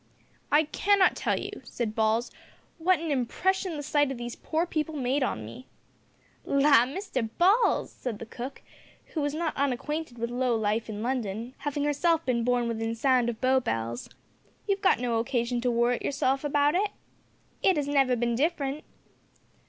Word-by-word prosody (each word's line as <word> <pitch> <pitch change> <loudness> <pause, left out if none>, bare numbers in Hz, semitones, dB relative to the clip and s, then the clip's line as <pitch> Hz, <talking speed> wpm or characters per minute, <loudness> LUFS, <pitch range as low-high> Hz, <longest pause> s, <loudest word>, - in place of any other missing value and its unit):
"I 300 +2 +5
cannot 390 +5 +3
tell - - 0
you," - - -5
said 230 -3 -4
Balls, 220 +2 +1 0.5
"what 365 +2 +3
a 320 0 -3
impression 345 +7 0
the 290 - -5
sight 290 -1 +2
o' - - -3
these 240 0 -6
poor 325 +2 -1
people 315 -2 -2
made 270 +1 0
on 110 - -1
me." 115 +4 -10 0.8
"La! 275 -4 +4
Mr 265 - -3
Balls," 395 +7 +3
said 245 -5 -5
the 230 - -8
cook, 250 +4 -8 0.5
who 315 - -1
was 290 0 -1
not 325 -1 -2
unacquainted 280 +1 -2
with 235 +1 -3
low 250 -1 +1
life 220 +1 -1
in 215 0 -4
London, 235 -1 -3
having 290 0 -2
herself 325 +3 +1
been 235 -2 +1
born 245 0 +1
within 225 0 -2
sound 250 0 +2
of 230 -2 -5
Bow 260 0 +3
Bells, 115 - -3 0.6
"you've 395 -1 0
got 385 - +4
no 240 -2 0
occasion 240 0 -1
to 250 - +1
worrit 240 +1 +1
yourself 270 -1 0
about 290 0 +2
it. 400 +4 +1 0.7
It 380 -4 +3
'as 290 -1 -1
never 270 -3 +3
bin 235 0 0
different." 285 +1 -1
260 Hz, 170 wpm, -28 LUFS, 235-300 Hz, 0.8 s, I